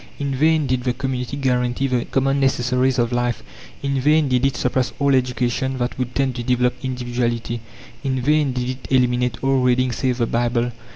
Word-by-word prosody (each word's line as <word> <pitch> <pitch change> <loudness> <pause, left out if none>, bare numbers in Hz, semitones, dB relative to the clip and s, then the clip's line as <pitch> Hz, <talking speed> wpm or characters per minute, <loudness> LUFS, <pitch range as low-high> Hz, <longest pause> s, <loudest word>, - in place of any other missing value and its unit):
In 140 -1 -2
vain 155 +3 +3
did 130 -2 -1
the 125 -1 0
community 130 0 -3
guarantee 125 -1 0
the 125 -3 0
common 135 +1 +1
necessaries 130 -1 +1
of 120 -1 +1
life, 120 -1 -1 0.4
in 140 -1 0
vain 150 +2 +3
did 125 0 +1
it 130 -3 -3
suppress 125 0 0
all 140 -1 +2
education 130 +1 0
that 120 -1 -2
would 125 -1 -3
tend 135 -2 +1
to - - -2
develop 125 0 +2
individuality, 120 -2 -2 0.4
in 130 -2 -1
vain 150 +2 +2
did 125 -1 -2
it 130 0 -5
eliminate 125 -2 +2
all 135 0 +3
reading 125 0 +2
save 125 0 -1
the 120 - +1
Bible. 120 +1 0
125 Hz, 185 wpm, -21 LUFS, 125-135 Hz, 0.4 s, vain